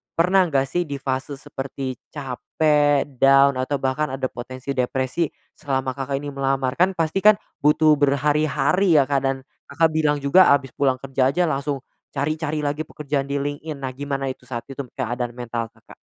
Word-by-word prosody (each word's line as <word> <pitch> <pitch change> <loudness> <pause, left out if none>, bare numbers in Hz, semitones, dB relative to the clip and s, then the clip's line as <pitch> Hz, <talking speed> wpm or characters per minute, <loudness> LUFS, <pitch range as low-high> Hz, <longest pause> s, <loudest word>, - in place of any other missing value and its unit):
pernah 185 +3 +4
enggak 135 -3 +1
sih 175 +4 0
di 140 - -4
fase 135 +1 -3
seperti 135 -2 -5 0.2
capek, 145 +1 +1
down 135 0 +6
atau 130 +3 -1
bahkan 135 +2 -1
ada 130 -1 -1
potensi 130 +2 -6
depresi, 130 +5 0 0.3
selama 135 -2 -2
Kakak 135 0 -3
ini 145 0 -6
melamar. 135 -1 -1
Kan 185 +2 +4
pasti 165 +3 0
kan, 215 0 +8 0.3
butuh 155 +1 +5
berhari-hari 150 +5 +2
ya 140 - +6
Kak, 140 -1 +2
dan 135 -1 -1 0.2
Kakak 160 +3 +3
bilang 150 -2 +1
juga 155 +7 +5
habis 135 -3 +2
pulang 130 -2 +1
kerja 135 0 +1
aja 180 +4 +1
langsung 140 -1 -2 0.4
cari-cari 155 +2 -1
lagi 145 +2 -1
pekerjaan 140 -2 -3
di 140 - -3
LinkedIn. 145 +2 -4
Nah, 130 -1 -4
gimana 140 -1 -3
itu 130 - -12
saat 120 -3 -4
itu 135 0 -10 0.2
keadaan 120 -1 -2
mental 115 -2 -4
Kakak? - - -18
140 Hz, 170 wpm, -22 LUFS, 135-150 Hz, 0.4 s, kan